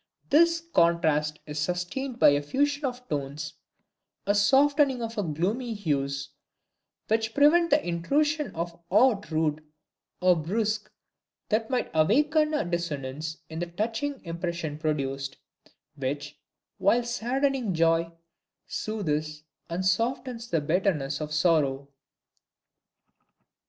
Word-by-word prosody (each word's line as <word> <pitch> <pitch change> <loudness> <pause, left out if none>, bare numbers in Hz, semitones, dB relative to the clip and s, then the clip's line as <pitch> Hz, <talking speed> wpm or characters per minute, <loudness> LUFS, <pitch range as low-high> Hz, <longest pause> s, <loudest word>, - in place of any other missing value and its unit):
This 335 +2 +5
contrast 155 -3 +2
is 150 0 -5
sustained 180 - -2
by - - +7
a 145 0 +2
fusion 285 - 0
of 250 -1 -4
tones, 150 +1 -4 0.7
a 205 - +3
softening 270 +5 +4
of 210 -9 -3
gloomy 225 - -1
hues, 140 -7 -2 0.8
which 220 +1 0
prevent 335 +4 +5
the 295 -5 +2
intrusion 295 - +1
of 170 +1 -4
aught 210 0 +3
rude 155 -1 0 0.6
or 180 0 +5
brusque 210 +6 -1 0.6
that 220 +1 +1
might 255 -2 -1
awaken 300 - +3
a 295 - 0
dissonance 155 -3 -3
in 160 0 -6
the 175 - -2
touching 225 +10 -3
impression 170 -3 -4
produced, 140 -3 -2 0.6
which, 145 +1 -4 0.4
while 235 +5 +3
saddening 250 0 0
joy, 165 0 +2 0.5
soothes 155 -8 -3 0.3
and 175 +3 -2
softens 235 +4 -1
the 165 - +1
bitterness 155 -3 0
of 150 0 -4
sorrow. 150 -4 +2
180 Hz, 110 wpm, -27 LUFS, 155-245 Hz, 0.8 s, by